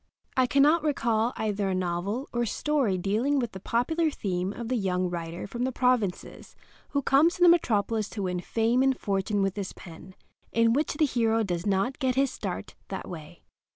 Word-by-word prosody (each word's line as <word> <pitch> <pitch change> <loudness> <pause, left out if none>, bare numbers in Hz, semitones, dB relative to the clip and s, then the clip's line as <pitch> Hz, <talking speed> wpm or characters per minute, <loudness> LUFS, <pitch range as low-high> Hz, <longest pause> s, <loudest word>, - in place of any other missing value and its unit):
I 255 -1 +3
cannot 290 +5 +4
recall 235 -6 +1
either 205 -2 -1
a 190 - 0
novel 185 +8 -2
or 240 - 0
a 240 - 0
story 265 -6 0
dealing 220 +10 0
with 240 -4 -1
the 190 - -8
popular 310 - 0
theme 185 -8 -2
of 230 +2 -6
the 255 - 0
young 185 -4 0
writer 170 0 -5
from 240 +4 -4
the 260 - 0
provinces 250 -7 -1 0.3
who 280 -1 -1
comes 305 +7 +4
to 360 - +1
the - - +8
metropolis 225 - +2
to 200 - -1
win 180 -1 -1
fame 230 +7 +1
and 265 -1 +2
fortune 200 0 0
with 195 -1 -1
his 195 -2 -4
pen 175 +2 -12 0.4
in 230 0 +3
which 295 +4 0
the 305 - +3
hero 225 -4 +1
does 175 -2 -3
not 200 +6 0
get 255 -2 +1
his 270 -1 +2
start - - -5
that - - -6
way. - - -10
225 Hz, 195 wpm, -27 LUFS, 195-260 Hz, 0.4 s, the